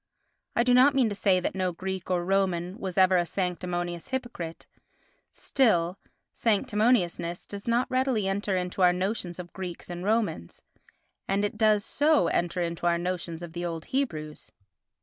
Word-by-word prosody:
I 235 Hz, -, +4 dB
do 250 Hz, 0 st, +3 dB
not 265 Hz, +3 st, +6 dB
mean 255 Hz, -4 st, +3 dB
to -, -, -3 dB
say 195 Hz, -2 st, +2 dB
that 180 Hz, -, -2 dB
no 185 Hz, -1 st, 0 dB
Greek 190 Hz, +1 st, -5 dB
or 175 Hz, -1 st, 0 dB
Roman 185 Hz, -1 st, 0 dB
was 190 Hz, -2 st, -5 dB
ever 185 Hz, -1 st, +5 dB
a 175 Hz, -, +3 dB
sanctimonious 175 Hz, -1 st, -3 dB
hypocrite, 240 Hz, -11 st, -5 dB, 0.7 s
still, 185 Hz, -8 st, +1 dB, 0.3 s
sanctimoniousness 210 Hz, -5 st, +1 dB
does 200 Hz, +1 st, -8 dB
not 235 Hz, +2 st, +2 dB
readily 255 Hz, -5 st, +1 dB
enter 195 Hz, 0 st, -1 dB
into 180 Hz, +1 st, -3 dB
our 180 Hz, -1 st, +6 dB
notions 185 Hz, -1 st, -2 dB
of 175 Hz, -1 st, -9 dB
Greeks 180 Hz, -2 st, -6 dB
and 175 Hz, 0 st, -5 dB
Romans 205 Hz, -, -1 dB, 0.6 s
and 200 Hz, +1 st, +1 dB
it 205 Hz, -, -3 dB
does 215 Hz, -2 st, +3 dB
so 295 Hz, -, +3 dB
enter 175 Hz, +1 st, 0 dB
into 170 Hz, 0 st, -2 dB
our 170 Hz, 0 st, +3 dB
notions 175 Hz, -1 st, -3 dB
of 165 Hz, -1 st, -8 dB
the 175 Hz, 0 st, -4 dB
old 165 Hz, -2 st, -4 dB
Hebrews. 155 Hz, -, -3 dB
185 Hz, 165 wpm, -27 LUFS, 175-215 Hz, 0.7 s, not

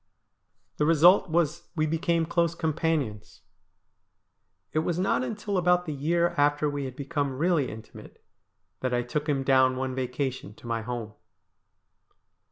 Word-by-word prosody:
The 150 Hz, -, +2 dB
result 170 Hz, +4 st, +5 dB
was 170 Hz, 0 st, 0 dB
we 155 Hz, -2 st, +1 dB
became 165 Hz, +1 st, 0 dB
close 170 Hz, 0 st, 0 dB
companions. 155 Hz, -9 st, -2 dB, 1.3 s
It 155 Hz, -, +2 dB
was 165 Hz, +1 st, -1 dB
not 190 Hz, +7 st, +1 dB
until 205 Hz, -5 st, -2 dB
about 180 Hz, 0 st, +2 dB
the 155 Hz, -, -3 dB
year 170 Hz, +5 st, +1 dB
after 145 Hz, +1 st, +3 dB
we 145 Hz, -1 st, -3 dB
had 130 Hz, -1 st, -7 dB
become 140 Hz, -1 st, -2 dB
really 165 Hz, -3 st, +1 dB
intimate 110 Hz, 0 st, -12 dB, 0.5 s
that 130 Hz, -1 st, -1 dB
I 120 Hz, -, 0 dB
took 150 Hz, +5 st, -3 dB
him 135 Hz, -2 st, +1 dB
down 130 Hz, -1 st, +4 dB
one 130 Hz, 0 st, -2 dB
vacation 130 Hz, -3 st, -3 dB
to -, -, -17 dB
my 115 Hz, -1 st, -2 dB
home. 115 Hz, -2 st, -5 dB
150 Hz, 145 wpm, -27 LUFS, 130-170 Hz, 1.3 s, result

